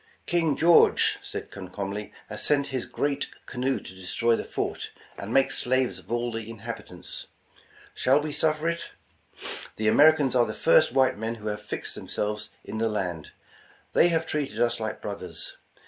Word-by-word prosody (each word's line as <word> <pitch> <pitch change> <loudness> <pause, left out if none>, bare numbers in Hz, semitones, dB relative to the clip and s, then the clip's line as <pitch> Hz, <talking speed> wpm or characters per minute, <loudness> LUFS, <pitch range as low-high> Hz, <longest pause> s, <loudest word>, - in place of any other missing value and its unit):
''King 165 -5 +1
George," 170 +1 +5
said - - -6
Comcomly, 100 +2 -5 0.2
''has - - -7
sent 145 -1 +2
his 130 -2 -3
great 145 0 -1 0.2
canoe 130 +1 -1
to - - -10
destroy 105 +5 +1
the - - -3
fort, - - -3 0.3
and 100 - -6
make 135 +2 +4
slaves 130 -1 +1
of - - -14
all 120 0 0
the 115 -1 -5
in 115 - -8
habitants. 115 -1 -7 0.7
Shall 135 +3 +4
we 150 0 -3
suffer 155 +1 +1
it? 170 0 -2 0.9
The 110 - -1
Americans 145 +3 +6
are 120 -2 +4
the 110 - -4
first - - +5
white 130 -4 +3
men 110 +1 -2
who 110 -1 -5
have 105 0 -4
fixed 105 - -4
themselves 105 +1 -3
in 110 - -5
the 115 0 +2
land. 90 -7 -3 0.6
They - - +6
have 165 -1 +1
treated 140 -9 -2
us 120 -1 +2
like 110 -1 -4
brothers. - - -6
120 Hz, 170 wpm, -27 LUFS, 110-145 Hz, 0.9 s, Americans